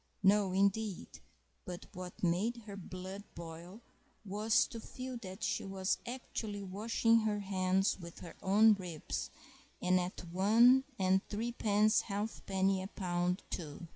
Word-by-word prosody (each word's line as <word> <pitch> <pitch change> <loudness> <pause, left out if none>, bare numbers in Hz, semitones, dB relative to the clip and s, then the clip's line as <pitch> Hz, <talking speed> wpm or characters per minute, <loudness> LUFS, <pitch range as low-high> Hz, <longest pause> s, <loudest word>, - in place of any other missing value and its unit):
No, 195 0 +4
indeed! 200 +1 0 0.4
But 180 -1 -7
what 180 0 -8
made 210 +7 +1
her 200 -2 -7
blood 190 +1 -7
boil 170 +5 -9 0.4
was 210 +3 +3
to 230 - -7
feel 255 +2 -6
that 190 -2 -8
she 210 -2 0
was 195 0 -1
actually 220 -4 -4
washing 225 +4 +2
her 215 -2 0
hands 190 0 +1
with 170 -1 -10
her 170 - -9
own 210 +3 +6
ribs—and 180 0 -3
at 180 +1 -4
one 230 +8 +6
and 190 -1 +3
threepence 215 -1 +2
halfpenny 195 -2 -1
a 190 - -4
pound, 180 -2 -1
too! 160 0 -6
195 Hz, 130 wpm, -34 LUFS, 185-215 Hz, 0.4 s, own